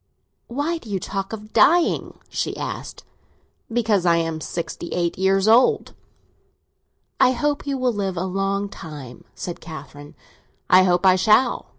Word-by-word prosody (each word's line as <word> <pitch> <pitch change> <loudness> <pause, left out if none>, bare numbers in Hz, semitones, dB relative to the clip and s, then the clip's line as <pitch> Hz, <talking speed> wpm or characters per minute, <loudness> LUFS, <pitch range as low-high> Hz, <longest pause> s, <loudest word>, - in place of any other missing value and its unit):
"Why 290 +7 -2
do 230 - -13
you 195 -2 -1
talk 195 +1 -4
about 220 -2 -6
your 215 - -17
dying?" 325 +11 +3
she - - -3
asked. - - -6 0.7
"Because 220 -5 +1
I 170 -1 +4
am 165 -1 -2
sixty 170 +1 -5
eight 170 -1 -1
years 195 +1 +2
old." 250 - +4 1.3
"I 255 - +5
hope 290 +3 -1
you 275 -1 -1
will 255 -2 0
live 195 -3 -3
a 175 - -1
long 195 +2 -1
time," 145 -10 -10
said 175 - -6
Catherine. 145 -3 -10 0.6
"I 185 - +8
hope 180 +1 +2
I 185 -1 +7
shall! 220 +6 +3
195 Hz, 155 wpm, -22 LUFS, 175-235 Hz, 1.3 s, I